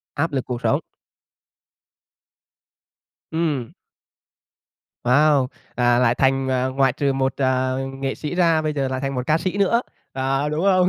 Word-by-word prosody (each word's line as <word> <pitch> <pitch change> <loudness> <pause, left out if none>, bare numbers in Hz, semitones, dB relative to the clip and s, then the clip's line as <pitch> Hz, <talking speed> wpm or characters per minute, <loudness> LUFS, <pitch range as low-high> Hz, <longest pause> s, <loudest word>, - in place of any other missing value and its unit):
Áp 155 +1 -1
lực 130 -2 -1
cuộc 125 -2 -4
sống. - - +2 2.5
Ừm. 150 -7 -1 1.3
Wow! 140 +2 +4 0.3
À, 120 -1 +3
lại 120 -1 +3
thành, 135 +1 +1
à, 130 0 +1
ngoại 130 0 +2
trừ 140 0 0
một, 135 -1 0
à, 130 -1 +1 0.3
nghệ 135 0 -2
sĩ 150 +3 -5
ra 165 -3 +3
bây 155 -1 -1
giờ 140 -2 -1
lại 130 0 -3
thành 135 0 -2
một 125 0 -3
ca 155 +1 +3
sĩ 185 +3 -3
nữa, 200 +4 +3 0.3
à, 135 +2 0
đúng 155 +4 -1
không? 185 -2 +4
135 Hz, 155 wpm, -22 LUFS, 130-155 Hz, 2.5 s, Wow